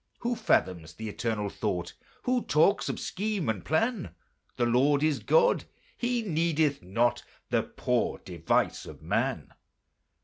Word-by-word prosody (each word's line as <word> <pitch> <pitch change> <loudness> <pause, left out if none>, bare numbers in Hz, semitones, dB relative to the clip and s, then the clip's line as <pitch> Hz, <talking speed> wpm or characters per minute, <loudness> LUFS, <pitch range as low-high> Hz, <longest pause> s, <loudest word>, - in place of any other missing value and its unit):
Who 240 0 0
fathoms 90 - 0
the 110 -1 -5
Eternal 105 -2 -2
Thought? 90 -5 -3 0.3
Who 250 -1 +1
talks 165 +7 +3
of - - -3
scheme 205 - -2
and 110 -4 -1
plan? 160 - 0 0.4
The 120 - +2
Lord 140 +5 +3
is 155 -3 +2
God! 485 0 +3 0.3
He 240 -1 -1
needeth 160 -5 +1
not 115 +7 +1 0.3
The - - +3
poor - - -1
device 85 -2 -1
of - - -11
man. - - -1
145 Hz, 135 wpm, -28 LUFS, -, 0.4 s, talks